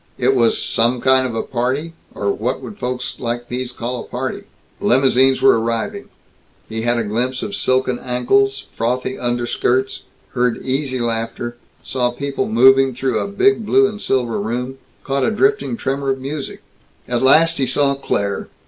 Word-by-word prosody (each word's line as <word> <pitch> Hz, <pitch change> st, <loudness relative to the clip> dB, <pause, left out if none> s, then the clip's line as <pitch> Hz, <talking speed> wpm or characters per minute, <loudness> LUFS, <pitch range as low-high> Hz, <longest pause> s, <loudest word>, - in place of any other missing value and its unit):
It 130 Hz, +1 st, +3 dB
was 115 Hz, -3 st, +3 dB
"some 120 Hz, +2 st, +2 dB
kind 130 Hz, +1 st, +3 dB
of 115 Hz, -, -5 dB
a 115 Hz, -, -1 dB
party? 135 Hz, +6 st, -2 dB, 0.2 s
or 100 Hz, 0 st, 0 dB
what 120 Hz, +6 st, -2 dB
would 210 Hz, -, -10 dB
folks 125 Hz, 0 st, -4 dB
like 120 Hz, 0 st, -4 dB
these 125 Hz, 0 st, -3 dB
call 125 Hz, +1 st, -4 dB
a -, -, -7 dB
party?" -, -, -5 dB, 0.3 s
Limousines 130 Hz, +1 st, +3 dB
were -, -, +6 dB
arriving; 115 Hz, 0 st, -3 dB, 0.6 s
he 110 Hz, 0 st, -4 dB
had 120 Hz, +1 st, +1 dB
a 115 Hz, -, 0 dB
glimpse 120 Hz, +5 st, -2 dB
of 100 Hz, -, -4 dB
silken 130 Hz, +3 st, +1 dB
ankles, 135 Hz, +2 st, +1 dB
frothy 125 Hz, +3 st, -2 dB
underskirts; 120 Hz, +2 st, 0 dB, 0.3 s
heard 125 Hz, -2 st, +1 dB
easy 130 Hz, 0 st, -1 dB
laughter; 120 Hz, 0 st, -3 dB, 0.3 s
saw 125 Hz, -2 st, 0 dB
people 140 Hz, +3 st, -3 dB
moving 130 Hz, +3 st, +5 dB
through 130 Hz, +1 st, 0 dB
a -, -, -2 dB
big 200 Hz, +2 st, +2 dB
blue 200 Hz, -1 st, +4 dB
and 210 Hz, +1 st, -7 dB
silver 125 Hz, -3 st, 0 dB
room; 125 Hz, +5 st, -4 dB, 0.2 s
caught 135 Hz, -1 st, -1 dB
a -, -, +3 dB
drifting 395 Hz, -, +1 dB
tremor 135 Hz, -5 st, -2 dB
of 135 Hz, 0 st, 0 dB
music. 140 Hz, +2 st, -5 dB, 0.4 s
At 120 Hz, -1 st, -1 dB
last 160 Hz, +5 st, +5 dB
he 135 Hz, -, +1 dB
saw 140 Hz, +2 st, +2 dB
Claire. 100 Hz, -7 st, -2 dB
130 Hz, 165 wpm, -19 LUFS, 120-135 Hz, 0.6 s, were